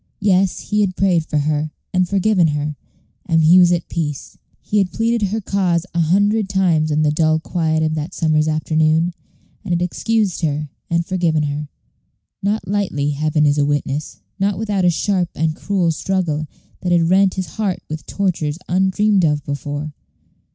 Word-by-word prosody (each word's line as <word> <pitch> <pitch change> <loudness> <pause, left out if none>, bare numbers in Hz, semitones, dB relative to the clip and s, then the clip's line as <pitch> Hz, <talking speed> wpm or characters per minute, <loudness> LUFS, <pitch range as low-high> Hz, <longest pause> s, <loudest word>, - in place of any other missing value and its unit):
Yes, 195 -2 +1
he 210 0 +3
had 190 -3 0
prayed 175 -5 +1
for 150 - -1
her, 150 +1 0 0.2
and 180 -1 +1
forgiven 195 -3 +3
her, 150 0 -2 0.5
and 165 -2 +3
he 170 +4 +7
was 175 -1 +6
at 175 -1 0
peace. 150 -4 -4 0.2
He 210 - -1
had 190 -2 0
pleaded 230 -2 0
her 215 +4 -2
cause 185 -4 0
a 170 - 0
hundred 200 +5 +2
times 175 -6 +2
in 155 0 +1
the 150 - +3
dull 155 +1 +2
quiet 160 -1 -1
of 155 0 0
that 155 +4 -4
summer's 155 -2 +1
afternoon, 155 +2 +1 0.5
and 185 -4 -2
had 170 - 0
excused 210 +1 -1
her, 150 -2 -1 0.2
and 170 0 0
forgiven 170 -5 0
her. 145 0 -3 0.7
Not 205 +3 -1
lightly, 185 -8 -1
Heaven 150 +1 +1
is 145 0 +2
a - - +3
witness; 145 -5 -2 0.2
not 195 +1 +1
without 205 -4 0
a - - +5
sharp 180 +1 0
and 160 0 0
cruel 185 -3 0
struggle, 160 -3 -1 0.3
that 180 - -2
had 170 -1 +3
rent 190 0 +4
his 185 -1 -2
heart 205 -4 -1
with 155 -2 -7
tortures 165 -6 -1
undreamed 190 +2 +2
of 150 -2 +1
before. 145 +2 -4
170 Hz, 175 wpm, -19 LUFS, 155-190 Hz, 0.7 s, he